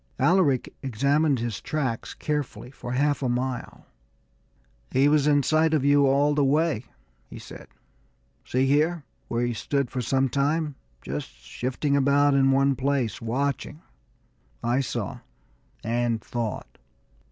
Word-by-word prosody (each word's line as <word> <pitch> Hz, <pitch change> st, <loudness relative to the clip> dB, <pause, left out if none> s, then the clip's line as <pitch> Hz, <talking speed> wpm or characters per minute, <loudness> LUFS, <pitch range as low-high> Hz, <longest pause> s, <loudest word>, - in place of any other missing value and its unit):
Alaric 170 Hz, -8 st, +2 dB
examined 140 Hz, +4 st, +1 dB
his 115 Hz, -4 st, -4 dB
tracks 130 Hz, -7 st, -3 dB
carefully 145 Hz, -4 st, -4 dB
for 120 Hz, -2 st, -7 dB
half 145 Hz, +3 st, +1 dB
a 130 Hz, -, 0 dB
mile. 125 Hz, 0 st, -3 dB, 1.0 s
"He 135 Hz, +2 st, +3 dB
was 150 Hz, -1 st, +3 dB
in 145 Hz, -1 st, +4 dB
sight 160 Hz, +2 st, +3 dB
of 140 Hz, -3 st, 0 dB
you 145 Hz, 0 st, +5 dB
all 140 Hz, +2 st, +3 dB
the 145 Hz, -1 st, +2 dB
way," 145 Hz, -3 st, +1 dB, 0.4 s
he -, -, -9 dB
said. -, -, -11 dB, 0.8 s
"See 130 Hz, +1 st, 0 dB
here, 150 Hz, +4 st, +2 dB, 0.2 s
where 120 Hz, +1 st, 0 dB
he 120 Hz, -, -1 dB
stood 140 Hz, +3 st, -2 dB
for 130 Hz, -, -2 dB
some 135 Hz, +3 st, +1 dB
time, 145 Hz, +3 st, 0 dB, 0.3 s
just 70 Hz, +3 st, -5 dB
shifting 125 Hz, -, -3 dB
about 140 Hz, +1 st, +4 dB
in 135 Hz, -1 st, +4 dB
one 135 Hz, 0 st, +3 dB
place, 130 Hz, -5 st, -1 dB
watching?" 140 Hz, +6 st, -2 dB, 0.8 s
I 120 Hz, +2 st, +1 dB
saw 135 Hz, -, -3 dB, 0.6 s
and 120 Hz, 0 st, 0 dB
thought. 115 Hz, -2 st, -5 dB
135 Hz, 135 wpm, -25 LUFS, 120-145 Hz, 1.0 s, you